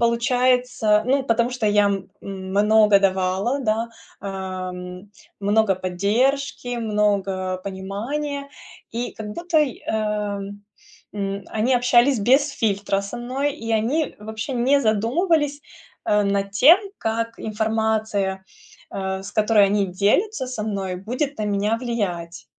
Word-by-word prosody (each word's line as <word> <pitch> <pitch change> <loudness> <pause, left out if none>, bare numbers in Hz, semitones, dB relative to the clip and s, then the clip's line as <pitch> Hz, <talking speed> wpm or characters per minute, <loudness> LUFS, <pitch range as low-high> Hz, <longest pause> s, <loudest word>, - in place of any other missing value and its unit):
получается, 245 -2 +2
ну, 270 +2 +2
потому 235 -1 +1
что 250 -3 -2
я, 205 0 +4
м, 195 -2 -2
много 200 +2 +3
давала, 190 +6 +1
да, 225 -1 0 0.3
ам, 185 -1 -6 0.3
много 205 0 +3
поддержки, 245 +8 0
много 200 -4 0
понимания. 250 +10 -4 0.4
И 235 +2 -3
как 215 -1 -7
будто 340 +4 0
и, 285 -5 -1
э, - - -3 1.2
м, 200 -1 -3
они 225 +4 +2
общались 245 +1 +4
без 270 +7 +4
фильтра 200 -5 0
со 200 - -6
мной, 270 +4 -2
и 230 0 -6
они 255 +8 0
вообще 220 +4 -5
не 260 +4 +3
задумывались, 285 - +1 0.5
э, 210 0 +4
над 200 0 -1
тем, 285 - +7 0.2
как 230 +1 -2
информация, 220 -3 -1 0.5
э, 190 0 -3
с 200 - -8
которой 210 -1 +4
они 200 0 +1
делятся 255 - +1
со 250 -4 -4
мной, 195 -3 -3
будет 250 +10 -3
на 215 - -1
меня 205 +2 0
влиять. 185 -9 -3
215 Hz, 125 wpm, -22 LUFS, 200-250 Hz, 1.2 s, тем